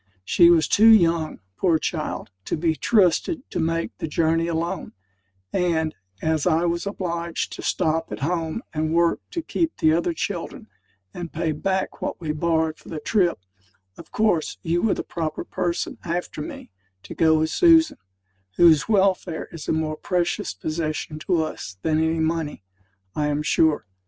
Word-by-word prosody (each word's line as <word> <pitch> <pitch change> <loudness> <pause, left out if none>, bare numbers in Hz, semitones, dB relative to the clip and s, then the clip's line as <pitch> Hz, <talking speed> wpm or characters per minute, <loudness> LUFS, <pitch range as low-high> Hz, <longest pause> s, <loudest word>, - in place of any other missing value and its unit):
She 170 - +6
was 165 -3 +4
too 220 +2 +6
young, 170 - +4 0.2
poor 170 -4 +3
child, 155 - -4
to - - -2
be 160 0 +1
trusted 220 - +2
to - - -2
make 165 0 -1
the - - -3
journey 165 +1 +1
alone; 170 +1 -3 0.6
and, 160 -3 +1 0.3
as 160 0 +1
I 165 0 +3
was 170 +2 -1
obliged 170 -4 -3
to - - -7
stop 160 +1 0
at - - -6
home 165 - -2
and 155 +1 -1
work 170 0 +3
to 335 -2 -4
keep 330 +1 -1
the 155 0 +3
other 170 +1 +1
children, - - -4 0.5
and 175 -2 -6
pay 165 0 -1
back 190 +5 -2
what - - -3
we 160 -3 -3
borrowed 160 0 0
for - - -15
the 160 - -4
trip, 180 +2 +1 0.6
of - - -13
course 210 -7 +1
you 170 +1 0
were 225 - +2
the - - -4
proper 160 -2 -4
person, 175 -2 -3
after 170 -2 -3
me, 150 - -8 0.3
to - - -8
go 160 -1 +4
with 160 0 0
Susan 325 -3 +5 0.6
whose 165 +1 +5
welfare 190 -5 +1
is 165 -3 -8
a - - +1
more 155 -1 -1
precious 175 0 -1
possession 155 - -3
to 165 0 +1
us 95 -10 -6
than 155 -1 +2
any 160 +1 +1
money, 160 - -2 0.5
I 150 -1 0
am 150 0 -1
sure. 155 0 +2
165 Hz, 165 wpm, -23 LUFS, 155-175 Hz, 0.6 s, She